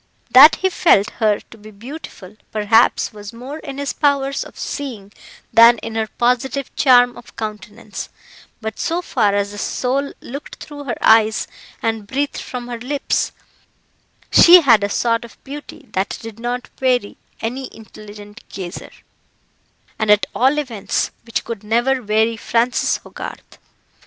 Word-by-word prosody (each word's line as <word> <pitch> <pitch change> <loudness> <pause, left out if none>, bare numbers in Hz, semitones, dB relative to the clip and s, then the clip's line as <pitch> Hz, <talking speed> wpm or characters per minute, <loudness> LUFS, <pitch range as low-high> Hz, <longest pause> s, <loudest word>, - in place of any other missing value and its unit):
That 275 +5 +9
he 375 0 0
felt 230 - +3
her 215 -3 +2
to 225 - -14
be 215 +1 -12
beautiful, 215 - -10 0.2
perhaps, 220 +2 +2
was 205 -1 -9
more 255 +6 -8
in 275 -4 -8
his 285 0 -3
powers 280 -2 +1
of - - -14
seeing 225 -9 -6 0.4
than 230 +1 +8
in 225 - -5
her 220 -1 -1
positive 250 +4 -1
charm 245 -3 +5
of - - -14
countenance; 210 0 -7 0.5
but 220 -1 -5
so 345 +2 -1
far 210 -10 +1
as 200 0 -1
the 205 - -8
soul 270 +5 -1
looked 280 +4 -8
through 290 -1 -10
her 240 -4 -3
eyes 220 -1 +4 0.4
and 225 -2 -2
breathed 280 +5 -2
from 245 -1 -7
her 240 -1 -6
lips, 275 +4 -1 1.0
she 355 +1 +9
had 230 -8 +5
a 200 - 0
sort 230 +2 0
of 235 - -13
beauty 285 0 -10
that 190 0 -2
did 225 -1 -10
not 245 +1 -4
weary 250 -5 +1 0.2
any 250 +4 -4
intelligent 210 0 -13
gazer, 185 -1 -7 1.1
and 220 -1 -1
at 210 0 +5
all 265 +4 +2
events, 240 -9 -2 0.2
which 230 - -2
could 225 -3 -6
never 240 +5 +1
weary 220 +1 +1
Francis 235 +3 +1
Hogarth. - - -10
235 Hz, 150 wpm, -19 LUFS, 215-270 Hz, 1.1 s, That